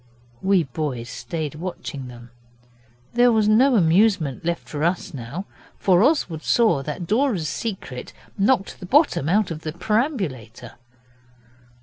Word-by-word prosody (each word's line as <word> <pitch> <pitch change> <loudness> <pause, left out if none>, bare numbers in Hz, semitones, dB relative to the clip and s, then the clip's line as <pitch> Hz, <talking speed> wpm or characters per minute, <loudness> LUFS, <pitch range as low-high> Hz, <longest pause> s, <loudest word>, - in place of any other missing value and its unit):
We 190 -2 +3
boys 130 -4 -4
stayed 155 -4 -5
watching 150 -5 -6
them. 120 -1 -12 0.8
There 245 +1 +5
was 220 -2 +2
no 245 +5 +5
amusement 175 - +3
left 170 0 -3
for 150 0 -4
us 170 0 -1
now, 140 +9 -6 0.3
for 185 -2 +3
Oswald 225 - +1
saw 215 - +3
that 150 +5 -5
Dora's 215 - +1
Secret 185 - -5 0.2
knocked 200 0 +1
the 180 - -8
bottom 275 - +3
out 200 0 +2
of 155 -1 -5
the 155 -1 -5
perambulator. 175 - -2
175 Hz, 130 wpm, -23 LUFS, 150-215 Hz, 0.8 s, There